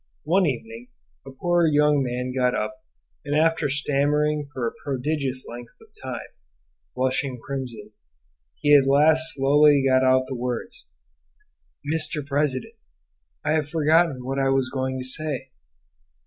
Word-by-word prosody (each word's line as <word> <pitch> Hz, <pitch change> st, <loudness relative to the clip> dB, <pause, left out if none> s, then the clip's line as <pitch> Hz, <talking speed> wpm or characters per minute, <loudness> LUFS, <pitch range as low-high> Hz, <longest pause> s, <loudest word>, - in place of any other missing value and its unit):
One 180 Hz, +4 st, +2 dB
evening 115 Hz, -2 st, -5 dB, 0.4 s
a -, -, -6 dB
poor 175 Hz, +5 st, +1 dB
young 150 Hz, -1 st, +3 dB
man 125 Hz, 0 st, -3 dB
got 125 Hz, -1 st, +1 dB
up, 130 Hz, +4 st, -4 dB, 0.4 s
and 145 Hz, -1 st, -2 dB
after 160 Hz, -2 st, +2 dB
stammering 145 Hz, +1 st, 0 dB
for 130 Hz, -4 st, -4 dB
a -, -, -3 dB
prodigious 135 Hz, -1 st, -3 dB
length 120 Hz, 0 st, -10 dB
of -, -, -19 dB
time, -, -, -6 dB, 0.7 s
blushing 130 Hz, 0 st, -1 dB
crimson, 120 Hz, -6 st, -6 dB, 0.6 s
he 145 Hz, -1 st, +4 dB
at 135 Hz, -2 st, +5 dB
last 150 Hz, +3 st, +4 dB
slowly 140 Hz, +1 st, +4 dB
got 130 Hz, 0 st, +3 dB
out 130 Hz, 0 st, +3 dB
the 135 Hz, -, -6 dB
words, 125 Hz, -, -5 dB, 1.0 s
"Mr. 155 Hz, -1 st, 0 dB
President, 145 Hz, -, -1 dB, 0.7 s
I -, -, +1 dB
have 155 Hz, -2 st, 0 dB
forgotten 155 Hz, -4 st, +2 dB
what 135 Hz, +1 st, -2 dB
I 135 Hz, 0 st, +2 dB
was 135 Hz, -1 st, +1 dB
going 130 Hz, -1 st, -2 dB
to 130 Hz, -, -5 dB
say." 135 Hz, -1 st, -3 dB
140 Hz, 140 wpm, -24 LUFS, 130-150 Hz, 1.0 s, at